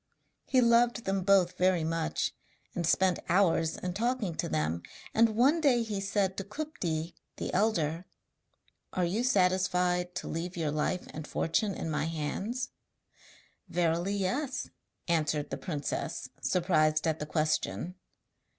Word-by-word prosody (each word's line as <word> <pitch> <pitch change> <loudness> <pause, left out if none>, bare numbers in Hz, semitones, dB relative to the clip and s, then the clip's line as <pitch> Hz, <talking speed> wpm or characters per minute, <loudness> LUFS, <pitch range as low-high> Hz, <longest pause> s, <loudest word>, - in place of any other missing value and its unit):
He 260 -2 +4
loved 235 0 +4
them 195 0 0
both 185 -2 +3
very 180 -2 +3
much, 165 0 -1 0.4
and 170 -2 -1
spent 185 +1 +3
hours 165 -3 +3
in 180 -1 -3
talking 230 -2 0
to - - -3
them, 80 +2 0 0.3
and 225 -1 +4
one 280 +8 +4
day 250 -6 +4
he 210 -3 -3
said 195 -1 0
to 195 - -2
Kupti, 185 - -3 0.2
the - - -4
elder: 180 -5 +1 0.9
'Are 180 - +1
you 200 +8 0
satisfied 180 -4 +2
to - - -4
leave 175 +2 -4
your 155 -3 0
life 155 +4 -1
and 155 0 -6
fortune 200 +5 0
in 160 - -3
my 150 0 0
hands?' 165 - -3 1.0
'Verily 175 +3 +1
yes,' 250 +9 -2 0.4
answered 155 -3 0
the 135 - -2
princess, 145 +1 -3
surprised 155 -4 +2
at 160 -1 0
the 150 - -4
question. 155 +3 0
180 Hz, 140 wpm, -30 LUFS, 160-205 Hz, 1.0 s, He